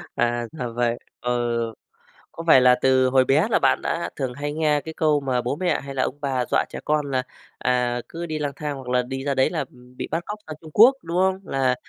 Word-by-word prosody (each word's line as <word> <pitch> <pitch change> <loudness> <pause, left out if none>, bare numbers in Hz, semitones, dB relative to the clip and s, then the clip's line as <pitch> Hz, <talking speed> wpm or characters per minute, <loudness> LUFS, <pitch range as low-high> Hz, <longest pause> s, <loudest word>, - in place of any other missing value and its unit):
À, 120 0 0
ra 125 -6 -4
vậy, 120 -1 +1 0.2
ừ. 120 -1 0 0.8
Có 165 - -8
phải 130 -5 +8
là 125 0 +6
từ 130 -1 +4
hồi 130 0 +4
bé 155 - +3
là - - +3
bạn - - +3
đã 170 - -2
thường 130 -3 -3
hay 145 +3 -4
nghe 150 -2 +1
cái 160 - -8
câu 155 -2 +2
mà 130 -2 0
bố 125 +4 -2
mẹ 180 +2 0
hay 140 0 -8
là 130 - +1
ông 140 - -3
bà 130 -3 0
dọa - - +3
trẻ - - -6
con 150 -2 0
là, 130 -1 0 0.3
à, 125 -1 0
cứ 170 +1 -5
đi 155 -2 -4
lang 145 -1 -1
thang 150 -2 -4
hoặc 130 -2 -10
là 125 0 +3
đi 135 +1 -5
ra 140 -1 0
đấy 130 - +3
là, 165 - -3
ừm, 125 0 -18
bị - - -4
bắt 165 +2 -1
cóc 210 0 -6
sang 155 - -6
Trung 155 -1 -12
Quốc, 245 +6 +7
đúng 170 +2 -3
không? 190 0 +2
Là 130 -6 +1
135 Hz, 250 wpm, -23 LUFS, 125-155 Hz, 0.8 s, phải